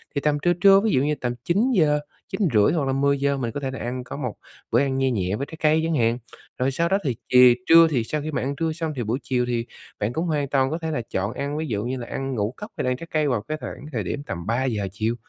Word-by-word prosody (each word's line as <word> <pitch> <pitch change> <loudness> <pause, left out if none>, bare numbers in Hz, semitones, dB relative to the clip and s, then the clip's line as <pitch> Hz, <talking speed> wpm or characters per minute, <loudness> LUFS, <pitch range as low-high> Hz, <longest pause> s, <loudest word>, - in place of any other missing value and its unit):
thì 140 - 0
tầm 150 -1 +2
trưa, 175 +3 +3
trưa, 195 +2 +6
ví 215 +1 +1
dụ 130 - +3
như 150 +1 +1
tầm 120 -3 -3
9:00, 175 - +2 0.3
9:30 120 - +2
hoặc 150 -5 0
là 135 - 0
10:00 140 0 +1
mình 120 -3 -2
có 145 - -4
thể 135 -2 -3
là 135 - -6
ăn 125 +1 -4
có 130 - -7
một 125 -6 -4 0.4
bữa 120 - +4
ăn 135 -1 +1
nhe 135 -1 +2
nhẹ 95 -3 -1
với 140 - -3
trái 160 - -11
cây 155 +1 +3
chẳng 165 -1 0
hạn. 115 -1 +2 0.4
Rồi 130 +2 +1
sau 170 +5 0
đó 195 - +3
thì 130 -6 -1
chì 125 -1 +7
trưa 165 0 +8
thì 125 -6 +1
sau 150 +6 -3
khi 155 - -4
mà - - -1
ăn 140 +2 -2
trưa 160 +3 -1
xong 160 -1 -3
thì 125 - -2
buổi 115 +4 -1
chiều 125 -2 0
thì 120 -1 -1 0.3
bạn 105 +3 -1
cũng 160 +6 -1
hoàn 150 -4 0
toàn 135 -2 +2
có 160 - -1
thể 160 -1 -3
là 125 - -1
chọn 100 +5 -1
ăn 140 +2 -3
ví 160 0 -2
dụ 105 -3 -2
như 130 +1 -2
là 120 - -6
ăn 135 -1 -3
ngũ 105 +2 -1
cốc 210 - -8
hay - - -1
là - - +1
ăn 125 - -1
trái 165 - -9
cây 155 -1 +1
vào 125 -6 0
cái 155 +7 -4
thoảng - - -7
thời 115 -6 -2
điểm 140 +10 -4
tầm 85 - -6
3:00 115 -4 0
chiều. 110 +4 -1
135 Hz, 295 wpm, -24 LUFS, 120-155 Hz, 0.4 s, trưa